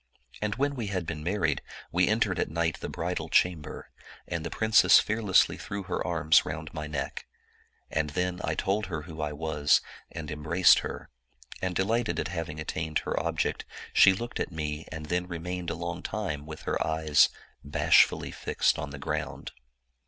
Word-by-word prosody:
And 105 Hz, 0 st, -1 dB
when 140 Hz, +3 st, 0 dB
we 120 Hz, -6 st, -4 dB
had 95 Hz, -3 st, -2 dB
been 80 Hz, -2 st, -4 dB
married, 85 Hz, -4 st, 0 dB, 0.3 s
we -, -, +3 dB
entered -, -, +1 dB
at -, -, 0 dB
night 80 Hz, 0 st, -1 dB
the -, -, -5 dB
bridal -, -, -3 dB
cham 90 Hz, -3 st, +3 dB
ber, -, -, -9 dB, 0.4 s
and -, -, -3 dB
the -, -, -3 dB
princess 110 Hz, -1 st, +6 dB
fearlessly 105 Hz, -3 st, +3 dB
thr6w 100 Hz, -2 st, -5 dB
her 90 Hz, -, -2 dB
arms 80 Hz, -2 st, +4 dB
round 75 Hz, +1 st, -6 dB
my 75 Hz, -2 st, -4 dB
neck. 75 Hz, -2 st, -4 dB, 0.6 s
And 75 Hz, 0 st, 0 dB
then 90 Hz, +3 st, -2 dB
I -, -, -1 dB
told 100 Hz, +1 st, 0 dB
her 80 Hz, -5 st, -4 dB
who 80 Hz, -1 st, -8 dB
I 75 Hz, -1 st, -1 dB
was, 75 Hz, -1 st, +2 dB, 0.3 s
and 80 Hz, -3 st, -6 dB
embraced 80 Hz, +4 st, +5 dB
her, -, -, -7 dB, 0.5 s
and 95 Hz, -1 st, -2 dB
delighted 110 Hz, +5 st, +1 dB
at -, -, -2 dB
having 80 Hz, -4 st, -4 dB
attained 80 Hz, 0 st, -2 dB
her -, -, 0 dB
object, 80 Hz, 0 st, -1 dB, 0.3 s
she 95 Hz, -, +8 dB
looked 120 Hz, +5 st, -5 dB
at -, -, -2 dB
me 75 Hz, -1 st, -4 dB
and 80 Hz, -1 st, -6 dB
then 90 Hz, +3 st, -1 dB
remained 90 Hz, 0 st, -4 dB
a 85 Hz, -, -2 dB
long 85 Hz, +1 st, -4 dB
time 85 Hz, -9 st, -4 dB
with 80 Hz, 0 st, -8 dB
her -, -, 0 dB
eyes 80 Hz, -2 st, +4 dB, 0.3 s
bashfully 70 Hz, -, +3 dB
fixed -, -, 0 dB
on 70 Hz, -, -4 dB
the 75 Hz, -, -8 dB
ground. 70 Hz, -, -4 dB
85 Hz, 180 wpm, -28 LUFS, 75-95 Hz, 0.6 s, she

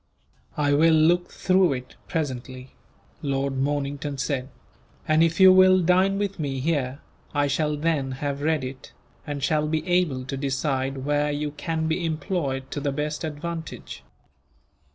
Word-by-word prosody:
"I 145 Hz, -1 st, +2 dB
will 160 Hz, +2 st, +5 dB
look 170 Hz, +3 st, +3 dB
through 185 Hz, -4 st, +3 dB
it, 125 Hz, -1 st, -7 dB
presently," 130 Hz, -5 st, -4 dB, 0.5 s
Lord 135 Hz, -1 st, -1 dB
Mornington 145 Hz, 0 st, -2 dB
said; 135 Hz, -1 st, -2 dB, 0.6 s
"and 155 Hz, +1 st, +4 dB
if 165 Hz, +1 st, +2 dB
you 190 Hz, -1 st, +9 dB
will 185 Hz, 0 st, +6 dB
dine 185 Hz, +3 st, +3 dB
with 200 Hz, -2 st, -2 dB
me 135 Hz, -3 st, -2 dB
here, 140 Hz, -2 st, -1 dB, 0.3 s
I 145 Hz, 0 st, +3 dB
shall 150 Hz, +1 st, 0 dB
then 145 Hz, -4 st, 0 dB
have 140 Hz, +1 st, -3 dB
read 155 Hz, -2 st, +1 dB
it, 130 Hz, 0 st, -8 dB, 0.3 s
and 145 Hz, -2 st, -4 dB
shall 150 Hz, +1 st, +1 dB
be 155 Hz, +2 st, -2 dB
able 175 Hz, -8 st, +1 dB
to 135 Hz, -, -4 dB
decide 135 Hz, -1 st, -2 dB
where 145 Hz, 0 st, +1 dB
you 145 Hz, 0 st, -2 dB
can 160 Hz, +2 st, -3 dB
be 160 Hz, +3 st, -1 dB
employed 155 Hz, -5 st, -2 dB
to -, -, -3 dB
the 140 Hz, 0 st, -1 dB
best 150 Hz, +3 st, -3 dB
advantage." 160 Hz, +1 st, -6 dB
150 Hz, 155 wpm, -25 LUFS, 135-165 Hz, 0.6 s, you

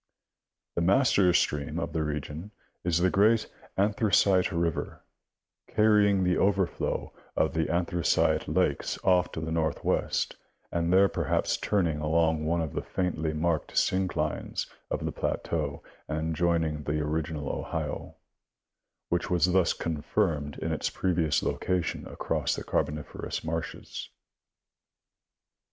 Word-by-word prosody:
The -, -, -1 dB
master 100 Hz, 0 st, +4 dB
stream 75 Hz, -1 st, +1 dB
of 85 Hz, -, -3 dB
the 80 Hz, -, 0 dB
region 75 Hz, +4 st, -4 dB, 0.3 s
is 85 Hz, -2 st, +2 dB
the 90 Hz, +1 st, +3 dB
great 110 Hz, +3 st, +4 dB, 0.3 s
Anthracite 100 Hz, -2 st, +3 dB
river, 85 Hz, -2 st, -2 dB, 0.6 s
carrying 105 Hz, -3 st, +4 dB
the 90 Hz, 0 st, +2 dB
overflow 95 Hz, -2 st, 0 dB, 0.2 s
of -, -, +2 dB
the 80 Hz, -1 st, 0 dB
Anthracite 85 Hz, 0 st, +1 dB
lakes -, -, 0 dB
off 90 Hz, -1 st, +3 dB
to -, -, -3 dB
the 80 Hz, 0 st, -4 dB
northwest 80 Hz, -2 st, 0 dB, 0.3 s
and 85 Hz, 0 st, 0 dB
there 95 Hz, +2 st, +6 dB
perhaps -, -, 0 dB
turning 85 Hz, -7 st, 0 dB
along 80 Hz, 0 st, +2 dB
one 85 Hz, +1 st, +1 dB
of 80 Hz, -3 st, -3 dB
the -, -, -2 dB
faintly 80 Hz, -4 st, -1 dB
marked 80 Hz, 0 st, -1 dB
synclines 95 Hz, 0 st, 0 dB, 0.2 s
of -, -, -2 dB
the -, -, -1 dB
plateau 75 Hz, -4 st, -2 dB, 0.2 s
and 80 Hz, +1 st, -2 dB
joining 80 Hz, -2 st, +1 dB
the 75 Hz, +1 st, -1 dB
original 75 Hz, -1 st, -2 dB
Ohio, -, -, -4 dB, 0.9 s
which 85 Hz, +1 st, 0 dB
was 90 Hz, 0 st, +3 dB
thus 90 Hz, -3 st, +4 dB
confirmed 75 Hz, -2 st, -1 dB
in -, -, -3 dB
its -, -, -1 dB
previous 85 Hz, -5 st, +1 dB
location 90 Hz, -3 st, -1 dB
across -, -, -1 dB
the -, -, -5 dB
Cai'boniferous 75 Hz, 0 st, -2 dB
marshes. 80 Hz, +1 st, -5 dB
85 Hz, 125 wpm, -28 LUFS, 80-95 Hz, 0.9 s, there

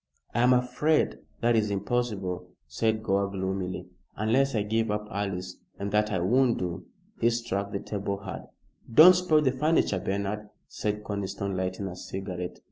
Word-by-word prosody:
"I -, -, 0 dB
am 125 Hz, +1 st, +5 dB
afraid 125 Hz, +5 st, +2 dB, 0.2 s
that 120 Hz, 0 st, +3 dB
is 110 Hz, -2 st, +2 dB
impossible," 100 Hz, -4 st, -2 dB, 0.2 s
said 110 Hz, +9 st, 0 dB
Gore, 100 Hz, -1 st, +1 dB
gloomily, 95 Hz, -1 st, -3 dB, 0.3 s
"unless 125 Hz, +5 st, +2 dB
I 105 Hz, -, +2 dB
give 110 Hz, +1 st, 0 dB
up 105 Hz, 0 st, -2 dB
Alice, 95 Hz, -3 st, -3 dB, 0.2 s
and 100 Hz, 0 st, -4 dB
that 105 Hz, +1 st, +2 dB
I 95 Hz, -, +1 dB
won't 120 Hz, +7 st, +3 dB
do." 90 Hz, 0 st, -4 dB, 0.3 s
He 115 Hz, -, +4 dB
struck 110 Hz, -4 st, -2 dB
the 100 Hz, -, -3 dB
table 100 Hz, -1 st, -3 dB
hard. 100 Hz, -, -7 dB, 0.4 s
"Don't 160 Hz, +9 st, +10 dB
spoil 175 Hz, -4 st, +3 dB
the 135 Hz, -3 st, +3 dB
furniture, 140 Hz, -, +2 dB
Bernard," 100 Hz, +2 st, -3 dB, 0.2 s
said 105 Hz, 0 st, -3 dB
Conniston, 100 Hz, -2 st, -3 dB
lighting 95 Hz, +1 st, -2 dB
a 95 Hz, -2 st, -5 dB
cigarette. 90 Hz, -1 st, -5 dB
105 Hz, 160 wpm, -28 LUFS, 95-120 Hz, 0.4 s, Don't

